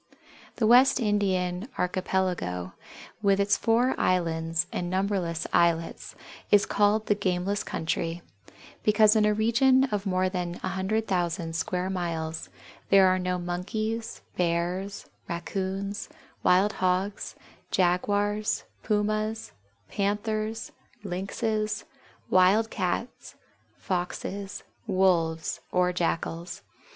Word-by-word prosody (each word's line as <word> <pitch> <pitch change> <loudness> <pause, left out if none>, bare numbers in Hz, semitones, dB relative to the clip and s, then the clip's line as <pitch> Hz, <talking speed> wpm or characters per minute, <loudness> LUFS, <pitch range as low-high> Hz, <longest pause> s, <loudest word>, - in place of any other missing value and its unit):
The 225 - +1
West 250 +4 +6
Indian 195 -2 0
Archipelago, 180 - -1 0.5
with 200 -1 +3
its 200 0 +3
four 240 +3 +2
islands 165 -1 +1
and 175 - -2
numberless 185 -3 -1
islets, 165 -1 +1 0.3
is 205 -1 +5
called 210 +1 +2
the - - +3
gameless 195 0 -1
country, 165 +1 -2 0.6
because 215 0 +5
in 215 -1 +4
a 210 - +3
region 255 +5 +4
of 205 -1 -1
more 185 0 +2
than 180 -2 -3
100,000 185 -4 -1
square 180 +2 -1
miles 165 -3 -3 0.4
there 195 -1 +7
are 185 0 +2
no 180 0 -1
Monkeys, 215 +6 -3 0.2
Bears, 180 +3 -1 0.2
Raccoons, 195 +3 -3 0.3
Wild 190 +4 +4
Hogs, 185 +2 0 0.3
Jaguars, 205 +4 +1 0.2
Pumas, 215 +1 -1 0.4
Panthers, 215 +2 -2 0.3
Lynxes, 215 +3 -2 0.4
Wild 195 +5 +4
Cats, 190 +5 -3 0.4
Foxes, 195 +1 -4 0.2
Wolves, 175 -5 +1
or 180 0 +2
Jackals. 170 0 -2
190 Hz, 100 wpm, -27 LUFS, 180-210 Hz, 0.6 s, there